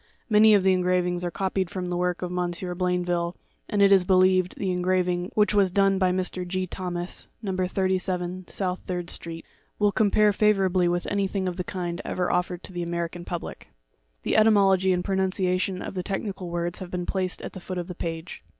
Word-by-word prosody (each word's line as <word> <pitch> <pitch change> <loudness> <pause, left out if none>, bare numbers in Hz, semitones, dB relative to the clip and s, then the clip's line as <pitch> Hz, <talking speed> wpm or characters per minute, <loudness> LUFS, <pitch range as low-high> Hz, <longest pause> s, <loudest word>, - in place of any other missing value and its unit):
Many 215 0 +7
of 200 - +3
the 190 0 +4
engravings 180 -1 +1
are 175 - -1
copied 190 0 -1
from 180 -1 -4
the - - -1
works 180 0 -1
of 180 0 -3
M. 180 -1 0 0.2
Blain 180 0 0
ville; 175 0 -1 0.3
and, 205 -1 +3
it 200 - +6
is 195 -2 +6
believed, 185 0 +3
the 190 -2 -1
engraving, 180 0 0
which 210 -1 +3
was 200 -2 +4
done 195 +1 +3
by 185 -1 +3
Mr. 185 0 -2
G. 185 +1 -2
Thomas, 180 -1 -4 0.2
(No. 190 -3 -2
87 185 -1 -1
South 185 -2 -2
Third 175 -2 -3
Street,) 165 -1 -7 0.3
will 205 -1 +3
compare 210 +1 +3
favour 210 -1 +3
ably 180 -1 +2
with 175 0 0
anything 195 -1 -1
of 180 - -2
the 180 - -3
kind 175 -1 -4
ever 180 -1 -1
offered 180 0 -1
to - - -8
the 175 - -3
American 170 0 -3
public. 175 -2 -6 0.6
The - - +1
etymology 195 -3 +5
and 180 -1 0
pronunciation 190 -1 0
of - - -6
the 185 - -2
technical 195 -1 -4
words 170 0 -3
have 185 -2 -7
been 180 -1 -3
placed 185 -1 -2
at - - -6
the - - -7
foot 185 +1 -6
of 175 - -2
the 180 - -6
page. 165 0 -6
185 Hz, 205 wpm, -26 LUFS, 175-190 Hz, 0.6 s, Many